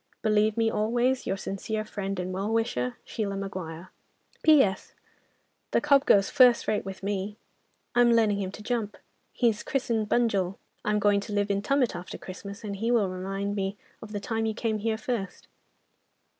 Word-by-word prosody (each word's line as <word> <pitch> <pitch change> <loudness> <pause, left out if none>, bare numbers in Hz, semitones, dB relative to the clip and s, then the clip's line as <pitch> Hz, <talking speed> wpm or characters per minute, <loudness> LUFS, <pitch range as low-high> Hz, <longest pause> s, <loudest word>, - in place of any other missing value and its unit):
"Believe 215 0 +3
me 225 -1 +3
always, 240 +4 +1
"Your 195 - 0
sincere 215 +3 -3
friend 195 -2 -4
and 180 +1 -3
well 195 +3 -2
wisher, 125 - 0
"SHEILA 200 -3 -3
MAGUIRE. 185 -3 -6 0.5
"P.S.—The 270 -12 0
cob 285 -1 +4
goes 195 -1 +5
first 250 -2 +5
rate 215 - +1
with 195 0 -8
me. 200 +1 -2 0.6
I'm 245 -1 +5
learning 220 -3 +3
him 190 -1 -3
to 210 - -9
jump. 220 -3 -2 0.3
He's 230 -4 +1
christened 230 -5 -1
'Bunjil.' 200 -6 +1 0.3
I'm 210 0 +1
going 205 0 +3
to 205 +1 -6
live 205 0 +1
in 200 0 0
Tumut 255 -1 +1
after 175 +1 -7
Christmas, 200 +3 -9
and 200 -2 -4
he 225 +4 -1
will 225 -5 +3
remind 195 +2 -3
me 195 0 -2 0.2
of 220 - -9
the 205 - -3
time 225 +1 -1
you 220 - -2
came 220 -2 -1
here 220 +1 -1
first." 220 -6 -4
210 Hz, 170 wpm, -27 LUFS, 195-225 Hz, 0.6 s, goes